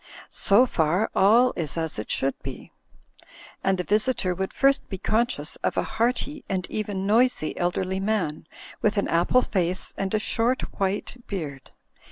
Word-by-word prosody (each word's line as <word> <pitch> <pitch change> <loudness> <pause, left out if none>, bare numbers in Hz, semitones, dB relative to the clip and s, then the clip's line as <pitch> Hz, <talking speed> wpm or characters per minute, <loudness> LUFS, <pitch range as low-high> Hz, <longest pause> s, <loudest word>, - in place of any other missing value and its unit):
So 205 +6 +4
far 180 -1 +1
all 230 +6 +5
is 160 -1 -3
as 160 -7 -2
it 105 - -6
should 135 +1 +1
be; - - -8 0.9
and 195 0 +2
the 180 - -1
visitor 215 -1 +1
would 190 +2 -3
first 275 0 +2
be 190 - -4
conscious 235 +6 -1
of - - -2
a - - +2
hearty 250 +6 -1
and 185 -2 -1
even 205 -3 -3
noisy 225 -5 +2
elderly 185 +2 -1
man, 195 -7 -1 0.3
with 215 0 +1
an 200 - +1
apple 175 +9 +3
face 185 -1 -1
and 195 -1 -1
a - - +4
short 230 +4 +1 0.2
white 195 +5 -1
beard. 145 -9 -5
195 Hz, 160 wpm, -25 LUFS, 180-225 Hz, 0.9 s, all